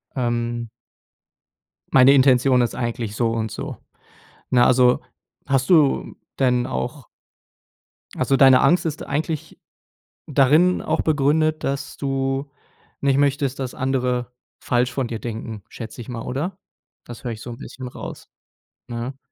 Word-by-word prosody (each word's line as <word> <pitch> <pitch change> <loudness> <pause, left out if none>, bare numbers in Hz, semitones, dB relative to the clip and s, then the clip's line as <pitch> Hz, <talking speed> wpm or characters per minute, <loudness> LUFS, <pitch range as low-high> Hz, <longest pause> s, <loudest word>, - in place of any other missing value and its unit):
Ähm 120 -2 -2 1.2
meine 130 +1 +7
Intention 130 -1 +5
ist 120 - -1
eigentlich 115 -3 -3
so 115 -2 +1
und 110 -1 -2
so.“ - - -6 0.7
Ne, 120 -1 +5
also, 125 -1 +4 0.5
hast 135 -1 0
du 155 -6 +3 0.2
denn 125 -2 +2
auch 65 0 -4 1.1
also, 135 - +2
deine 130 -1 +7
Angst 170 +5 +3
ist 155 -1 -3
eigentlich 155 +1 -3 0.7
darin 150 +6 +4
auch - - 0
begründet, 155 +1 +1
dass 140 +1 -3
du 135 0 -2 0.5
nicht 140 -1 +2
möchtest, 140 -1 +1
dass 130 -2 -4
andere 125 -2 -1 0.3
falsch 125 0 +1
von 130 -2 -2
dir 115 - -4
denken, 110 -2 -6
schätze 115 0 -9
ich 115 - -9
mal, 120 -2 -5
oder? 170 +9 -4 0.5
Das 120 - -10
höre 120 - -2
ich 110 - -8
so 120 - -7
'n 120 - -8
bisschen 130 -1 -8
raus, - - -9 0.6
ne? 120 +2 -5
130 Hz, 135 wpm, -22 LUFS, 120-140 Hz, 1.2 s, meine